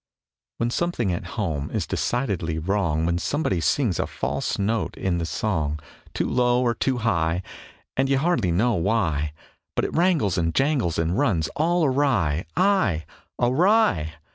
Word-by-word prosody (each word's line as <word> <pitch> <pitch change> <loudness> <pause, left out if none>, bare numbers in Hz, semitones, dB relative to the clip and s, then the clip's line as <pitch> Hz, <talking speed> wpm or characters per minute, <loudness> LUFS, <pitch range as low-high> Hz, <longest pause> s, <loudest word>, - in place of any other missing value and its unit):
When 120 +1 -1
something 120 - 0
at 85 - -4
home 80 -9 -2
is - - -2
decidedly 100 -11 -1
wrong, 85 -2 0
When 85 +1 0
somebody 100 - -1
sings 110 - +1
a - - 0
false - - -2
note 110 +2 -1
in 90 -2 -1
the 85 - -2
song, 80 -7 -1 0.4
Too - - 0
low 125 0 +2
or 120 -1 +2
too 130 +3 0
high, 85 -6 0 0.5
And, 135 +1 +1
you 135 - +3
hardly 135 - +1
know 115 +8 +2
why, 80 -7 0 0.4
But - - +1
it - - -4
wrangles 160 - +2
and 85 -1 -1
jangles 135 - +1
and 85 +6 0
runs 100 - +1
all 170 +2 +1
awry,... 125 - +1
Aye, 180 - +2 0.3
awry! 130 - +3
105 Hz, 155 wpm, -24 LUFS, 85-135 Hz, 0.5 s, you